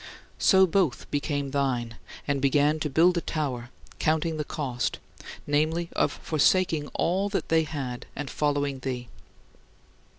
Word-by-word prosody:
So 190 Hz, -1 st, +6 dB
both 170 Hz, -, +1 dB
became 145 Hz, -1 st, -1 dB
thine, 125 Hz, -4 st, -1 dB, 0.3 s
and 140 Hz, -2 st, 0 dB
began 145 Hz, +3 st, +3 dB
to 150 Hz, -, -2 dB
"build 170 Hz, +5 st, +4 dB
a -, -, -8 dB
tower", 130 Hz, -8 st, -3 dB, 0.3 s
counting 160 Hz, +1 st, +1 dB
the 150 Hz, -, -1 dB
cost 130 Hz, -5 st, -2 dB, 0.5 s
namely, 155 Hz, +4 st, +1 dB
of -, -, +2 dB
forsaking 160 Hz, 0 st, +1 dB
all 190 Hz, +4 st, +1 dB
that 200 Hz, -, -2 dB
they 160 Hz, -1 st, +3 dB
had 135 Hz, -5 st, -5 dB
and 145 Hz, 0 st, -4 dB
following 145 Hz, -1 st, -1 dB
thee. 125 Hz, -2 st, -4 dB
145 Hz, 135 wpm, -27 LUFS, 135-160 Hz, 0.5 s, So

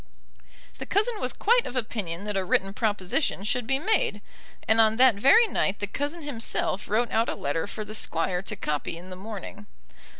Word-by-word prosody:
The -, -, -6 dB
cousin 430 Hz, +2 st, 0 dB
was 250 Hz, -, 0 dB
quite 475 Hz, +3 st, +2 dB
of 250 Hz, -, -7 dB
opinion 205 Hz, -7 st, -3 dB
that 210 Hz, -1 st, -3 dB
a 195 Hz, -, +1 dB
written 195 Hz, +1 st, +1 dB
proposition 210 Hz, -, -1 dB
should 235 Hz, +2 st, -1 dB
be 270 Hz, +1 st, +2 dB
made; 315 Hz, -, +1 dB, 0.5 s
and 220 Hz, +1 st, +5 dB
on 220 Hz, 0 st, +4 dB
that 255 Hz, -1 st, +7 dB
very 275 Hz, -, +6 dB
night 205 Hz, -, 0 dB
the 205 Hz, -, -2 dB
cousin 290 Hz, +10 st, -4 dB
himself 225 Hz, -7 st, -2 dB
wrote 230 Hz, +3 st, +1 dB
out 225 Hz, +1 st, +2 dB
a -, -, -2 dB
letter 155 Hz, +5 st, -2 dB
for 215 Hz, +1 st, -6 dB
the 215 Hz, -, -8 dB
Squire 180 Hz, -3 st, -1 dB
to 195 Hz, -, -4 dB
copy 150 Hz, +2 st, -3 dB
in 180 Hz, +2 st, -11 dB
the -, -, -5 dB
morning. 205 Hz, +1 st, -8 dB
215 Hz, 195 wpm, -26 LUFS, 195-260 Hz, 0.5 s, that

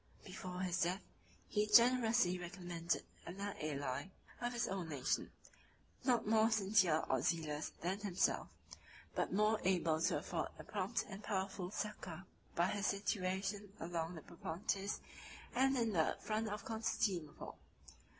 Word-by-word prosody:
48 185 Hz, -, -10 dB
Before 180 Hz, -1 st, -5 dB
his 185 Hz, 0 st, 0 dB
death, 180 Hz, +3 st, +1 dB, 0.4 s
he 210 Hz, 0 st, +1 dB
generously 230 Hz, -4 st, +6 dB
recommended 175 Hz, -1 st, -2 dB, 0.2 s
another 200 Hz, +3 st, -4 dB
ally 140 Hz, -1 st, -2 dB, 0.3 s
of 240 Hz, 0 st, 0 dB
his 240 Hz, 0 st, 0 dB
own 185 Hz, -4 st, -3 dB
nation; 140 Hz, -4 st, 0 dB, 0.7 s
not 245 Hz, -3 st, +3 dB
more 220 Hz, +1 st, +5 dB
sincere 195 Hz, -7 st, +4 dB
or 130 Hz, -2 st, +2 dB
zealous 155 Hz, 0 st, 0 dB
than 185 Hz, +3 st, -1 dB
himself, 200 Hz, -3 st, +1 dB, 0.7 s
but -, -, 0 dB
more 210 Hz, +2 st, +3 dB
able 165 Hz, -4 st, +2 dB
to 170 Hz, -, +3 dB
afford -, -, -2 dB
a -, -, -8 dB
prompt 205 Hz, +2 st, -1 dB
and 195 Hz, 0 st, -7 dB
powerful 190 Hz, -3 st, -2 dB
succor, 190 Hz, -4 st, -4 dB, 0.3 s
by 170 Hz, -, +4 dB
his 205 Hz, 0 st, 0 dB
situation 195 Hz, 0 st, -1 dB
along 165 Hz, 0 st, -2 dB
the 160 Hz, -, -7 dB
Propontis 190 Hz, +4 st, -2 dB, 0.5 s
and 265 Hz, +2 st, +4 dB
in 230 Hz, -3 st, +1 dB
the 160 Hz, -3 st, +2 dB
front 220 Hz, 0 st, -1 dB
of 205 Hz, 0 st, -4 dB
Constantinople. 205 Hz, -8 st, -1 dB
190 Hz, 140 wpm, -38 LUFS, 170-215 Hz, 0.7 s, generously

